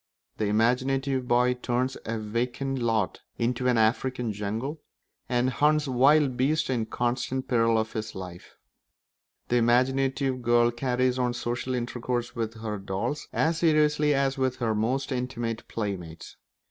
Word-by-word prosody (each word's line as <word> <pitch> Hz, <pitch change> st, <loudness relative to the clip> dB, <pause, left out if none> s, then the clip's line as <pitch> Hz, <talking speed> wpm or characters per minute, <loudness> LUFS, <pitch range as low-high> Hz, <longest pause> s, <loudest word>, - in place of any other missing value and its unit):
The 105 Hz, -, 0 dB
imaginative 130 Hz, +4 st, +1 dB
boy 125 Hz, +1 st, +3 dB
turns 125 Hz, +1 st, -1 dB
a 115 Hz, 0 st, -2 dB
vacant 120 Hz, +5 st, -2 dB
lot 115 Hz, -5 st, 0 dB, 0.2 s
into 125 Hz, +2 st, 0 dB
an 125 Hz, -2 st, +3 dB
African 120 Hz, +1 st, +1 dB
jungle, 110 Hz, +9 st, -4 dB, 0.5 s
and 125 Hz, +1 st, +1 dB
hunts 150 Hz, +2 st, +2 dB
wild 135 Hz, +1 st, +4 dB
beasts 140 Hz, +3 st, +1 dB
in 115 Hz, -4 st, -1 dB
constant 125 Hz, +2 st, -2 dB
peril 115 Hz, -2 st, +3 dB
of 110 Hz, 0 st, -1 dB
his 110 Hz, 0 st, -4 dB
life; 90 Hz, -2 st, -9 dB, 0.9 s
the 120 Hz, -, +3 dB
imaginative 130 Hz, +2 st, +2 dB
girl 120 Hz, 0 st, +4 dB
carries 125 Hz, +1 st, 0 dB
on 125 Hz, -1 st, 0 dB
social 120 Hz, +2 st, -2 dB
intercourse 120 Hz, 0 st, -3 dB
with 115 Hz, -1 st, -4 dB
her 105 Hz, -2 st, -3 dB
dolls 100 Hz, +10 st, -3 dB
as 160 Hz, +1 st, +1 dB
seriously 150 Hz, -2 st, +3 dB
as 135 Hz, 0 st, 0 dB
with 130 Hz, -1 st, +1 dB
her 115 Hz, -3 st, -1 dB
most 120 Hz, +7 st, -1 dB
intimate 120 Hz, -3 st, -3 dB
playmates. 90 Hz, -7 st, -5 dB
125 Hz, 140 wpm, -27 LUFS, 115-130 Hz, 0.9 s, wild